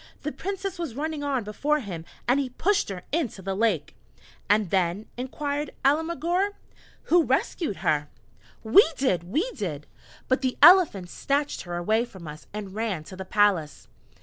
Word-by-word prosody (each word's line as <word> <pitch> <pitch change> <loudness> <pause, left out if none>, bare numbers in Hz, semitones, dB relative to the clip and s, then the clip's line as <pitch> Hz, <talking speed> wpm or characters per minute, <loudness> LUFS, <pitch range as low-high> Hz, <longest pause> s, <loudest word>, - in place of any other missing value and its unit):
The 300 - -2
Princess 390 0 -5
was 315 -9 -4
running 305 +1 -3
on 275 -4 0
before 285 +9 0
him, 180 - -6 0.2
and 250 +3 +4
he 270 -2 -1
pushed 390 - +1
her 185 -2 -6
into 270 - -2
the 195 +1 -2
lake." 190 -8 0 0.6
"And 205 -3 +3
then," 185 +2 +1
inquired 285 +3 -3
Alemguir, 340 +6 +1 0.5
"who 350 +1 +4
rescued 315 - 0
her?" 150 -1 +1 0.5
"We 230 - +7
did 185 - +1
we 320 - -1
did: 155 - -5 0.4
but 260 - +2
the 260 -2 -1
Elephant 300 - +6
snatched 285 +1 -1
her 175 - -2
away 215 +6 +1
from 190 -8 -12
us 150 0 -10
and 200 -2 -6
ran 210 -7 -2
to 185 - -10
the 190 0 -7
palace!" 190 -7 +1
230 Hz, 160 wpm, -26 LUFS, 190-300 Hz, 0.6 s, We